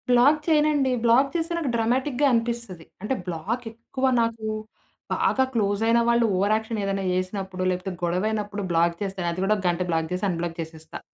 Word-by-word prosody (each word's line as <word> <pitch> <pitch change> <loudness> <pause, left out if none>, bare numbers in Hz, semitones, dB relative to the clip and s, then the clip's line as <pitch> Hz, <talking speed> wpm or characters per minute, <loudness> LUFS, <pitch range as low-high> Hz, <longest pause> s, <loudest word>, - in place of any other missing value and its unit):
Black 255 +5 +5
చేయనండి. 300 -4 +3
Black 250 +4 +5
చేస్తే 335 +1 -1
నాకు 315 -5 -1
డ్రామాటిక్‌గా 255 +4 +1
అనిపిస్తది. 230 -7 -2 0.2
అంటే 215 +6 -1
బ్లాక్ 190 +9 -3
ఎక్కువ 235 +4 -4 0.2
నాకు, 230 -1 -2 0.7
బాగా 265 - +2
క్లోస్ 205 -2 +1
అయిన 230 +1 +4
వాళ్ళు 235 0 +4
ఓవర్ 200 +3 +2
యాక్షన్ 220 0 -3
ఏదైనా 195 0 -1
జేసినప్పుడు 185 0 -2
లేకపోతే 185 +1 -2
గొడవయినప్పుడు 205 +4 -1
బ్లాక్ 170 0 +2
చేస్తాను. 190 -3 -3
అది 170 - -5
కూడా 205 +2 +3
ఒక 195 - -6
గంట 175 +1 -1
బ్లాక్ 160 -1 0
జేసి 180 +2 -1
అన్‌బ్లాక్ 170 -1 -3
జేసేస్తా. 160 -1 -7
210 Hz, 165 wpm, -25 LUFS, 185-240 Hz, 0.7 s, బ్లాక్